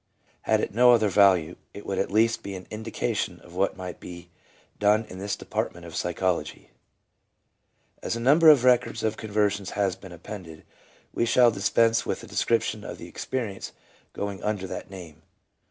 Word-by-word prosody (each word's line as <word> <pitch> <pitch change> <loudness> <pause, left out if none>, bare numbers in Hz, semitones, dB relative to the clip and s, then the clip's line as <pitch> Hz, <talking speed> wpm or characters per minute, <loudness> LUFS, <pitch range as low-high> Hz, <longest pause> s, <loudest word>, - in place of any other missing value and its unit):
Had - - +1
it - - -3
no 125 +2 +6
other 110 -3 +3
value, 95 -5 +4 0.2
it 100 - -9
would 95 - -2
at - - 0
least 115 +3 +2
be 100 -1 -6
an 90 -1 -9
indication 110 +1 -3
of 85 - -16
what 95 +2 0
might 90 -3 -7
be 85 -1 -10 0.5
done 105 +2 +3
in 95 - -10
this 100 +1 -2
department 85 0 -4
of 85 - -9
psychology. 85 -2 -2 1.3
As - - -2
a - - -4
number 150 +7 +6
of 145 -5 +6
records 125 -1 +2
of 110 0 0
conversions 105 -2 -1
has 100 -3 +1
been 95 - -13
appended, 85 -2 -10 0.5
we 115 - 0
shall 120 0 +5
dispense 115 +3 +2
with - - -4
a - - -8
description - - 0
of - - -7
the - - -10
experience 115 -7 -5 0.4
going 100 -1 -5
under 105 -3 -2
that - - -7
name. 85 -5 -11
100 Hz, 170 wpm, -26 LUFS, 90-115 Hz, 1.3 s, no